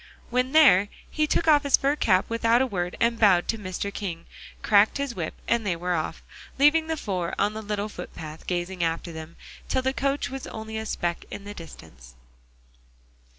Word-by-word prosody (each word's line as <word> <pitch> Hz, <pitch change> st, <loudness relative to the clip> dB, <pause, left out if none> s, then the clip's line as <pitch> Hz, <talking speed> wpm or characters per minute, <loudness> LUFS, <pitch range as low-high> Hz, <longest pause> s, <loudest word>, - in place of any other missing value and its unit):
When 250 Hz, +1 st, +1 dB
there, 260 Hz, -11 st, +6 dB, 0.2 s
he 305 Hz, 0 st, +1 dB
took 330 Hz, -, 0 dB
off 300 Hz, -2 st, +6 dB
his 280 Hz, -2 st, +4 dB
fur 280 Hz, +2 st, +1 dB
cap 185 Hz, -9 st, +3 dB
without 230 Hz, +1 st, +2 dB
a 265 Hz, -, +3 dB
word, 180 Hz, -7 st, -3 dB
and 235 Hz, 0 st, +1 dB
bowed 190 Hz, -5 st, +5 dB
to 225 Hz, -, +1 dB
Mr. 200 Hz, +1 st, -4 dB
King, 175 Hz, -6 st, -5 dB, 0.4 s
cracked 210 Hz, +3 st, +4 dB
his 280 Hz, -3 st, -2 dB
whip 170 Hz, -6 st, -4 dB
and 235 Hz, -1 st, +2 dB
they 190 Hz, -4 st, 0 dB
were 180 Hz, +2 st, -2 dB
off, 155 Hz, -2 st, -3 dB, 0.3 s
leaving 305 Hz, +3 st, +4 dB
the 320 Hz, 0 st, -2 dB
four 185 Hz, -, -3 dB
on 205 Hz, +1 st, +1 dB
the 220 Hz, -, -5 dB
little 210 Hz, -1 st, -3 dB
foot 215 Hz, -, -8 dB
path 155 Hz, 0 st, -9 dB
gazing 180 Hz, 0 st, -2 dB
after 165 Hz, +1 st, -2 dB
them, 160 Hz, 0 st, -9 dB, 0.3 s
till 260 Hz, -, +1 dB
the 265 Hz, 0 st, +1 dB
coach 275 Hz, -1 st, -1 dB
was 270 Hz, -1 st, -6 dB
only 220 Hz, 0 st, -7 dB
a 220 Hz, -, -5 dB
speck 175 Hz, -3 st, -2 dB
in 200 Hz, -, -7 dB
the 205 Hz, +1 st, -7 dB
distance. 60 Hz, -, -13 dB
205 Hz, 195 wpm, -26 LUFS, 175-260 Hz, 0.4 s, there